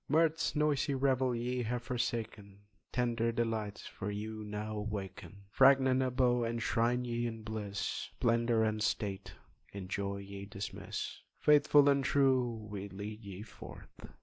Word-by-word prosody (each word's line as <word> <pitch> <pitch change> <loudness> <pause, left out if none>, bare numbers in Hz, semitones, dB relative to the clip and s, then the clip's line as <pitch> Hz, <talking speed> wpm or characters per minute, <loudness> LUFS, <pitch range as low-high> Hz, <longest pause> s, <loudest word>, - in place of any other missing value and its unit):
Mirth's 160 +2 +2
noisy 150 -2 +2
revel 130 -2 +2
ye 125 +2 -1
have 120 +1 -2
forsaken, 115 -5 -3 0.3
Tender 115 -2 +1
delights 115 -3 -2
for 100 - -5
you 110 +1 -5
now 105 +1 -4
awaken! 100 -1 -6
Fragrant 130 +1 +5
abode 125 -2 +2
enshrine 115 +1 +1
ye 120 0 -1
in 115 -1 -6
bliss, 105 -2 -3
Splendour 115 -1 +2
and 110 -1 0
state 100 -2 -2 0.4
in 100 -2 -7
joy 100 0 -2
ye 100 0 -8
dismiss, 100 0 -5 0.2
Faithful 145 -1 +6
and 140 -1 +4
true, 130 -3 +3 0.2
we 100 -1 -5
lead 105 +3 -7
ye 100 0 -7
forth!" 110 - -12
115 Hz, 135 wpm, -33 LUFS, 105-125 Hz, 0.4 s, Faithful